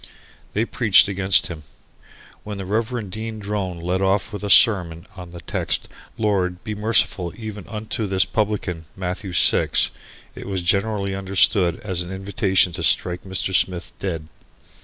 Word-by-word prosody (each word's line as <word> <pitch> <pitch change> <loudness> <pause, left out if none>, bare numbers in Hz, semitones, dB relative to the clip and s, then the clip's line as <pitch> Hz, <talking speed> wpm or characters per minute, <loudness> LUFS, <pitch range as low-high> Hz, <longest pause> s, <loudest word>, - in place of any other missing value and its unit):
They 110 +3 +1
preached 110 -6 +4
against 95 -1 +4
him. 80 -3 -7 0.8
When 105 -1 -6
the 95 - -5
Rev. 110 +1 -2
Dean 110 +2 -5
Drone 100 -4 -4
led 90 +3 -1
off 95 +3 0
with 105 - -6
a 105 - -3
sermon 90 -7 +4
on 90 -2 -9
the 85 0 -10
text - - -2 0.3
"Lord 95 -4 0
be 110 -1 -4
merciful 105 -4 +1
even 110 -4 -7
unto 110 0 -4
this 95 -1 +2
publican 100 -6 -2
Matthew 95 +1 -4
Six," 90 - +3 0.4
it - - -9
was 95 -3 -2
generally 100 +2 0
understood 95 -2 +2
as 95 -4 -3
an 90 +1 -6
invitation 95 -1 +1
to 85 - -4
strike 90 +2 +1
Mr. 95 0 -2
Smith 90 -2 0
dead. 80 -5 -4
95 Hz, 155 wpm, -22 LUFS, 90-105 Hz, 0.8 s, preached